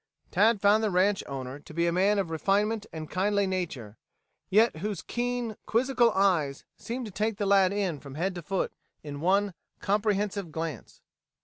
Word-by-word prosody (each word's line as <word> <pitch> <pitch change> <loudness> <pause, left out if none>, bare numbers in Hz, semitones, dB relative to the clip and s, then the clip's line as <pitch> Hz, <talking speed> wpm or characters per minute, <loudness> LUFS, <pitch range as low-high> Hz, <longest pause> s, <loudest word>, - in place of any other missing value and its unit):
Tad 220 0 +4
found 210 +2 +4
the 215 - +2
ranch 195 +2 +2
owner 135 0 -6
to 150 - -13
be 170 0 +2
a 170 - +2
man 195 +4 +3
of 190 -5 -1
refinement 205 +6 +1
and 160 -1 -6
kindly 200 +3 +1
nature, 160 - -4 0.5
yet 215 -2 +4
whose 200 +1 -4
keen, 245 -2 -2
quizzical 245 +1 +3
eyes 170 -8 +1
seemed 245 +2 -5
to 215 - -7
take 210 +2 -1
the 205 - -1
lad 195 -2 +4
in 195 -7 -1
from 140 -1 -10
head 185 +5 -1
to 175 - -6
foot 185 +4 -2 0.3
in 145 -1 -7
one 195 +3 +2 0.3
comprehensive 205 -3 0
glance. 160 -1 -6
195 Hz, 175 wpm, -28 LUFS, 165-210 Hz, 0.5 s, Tad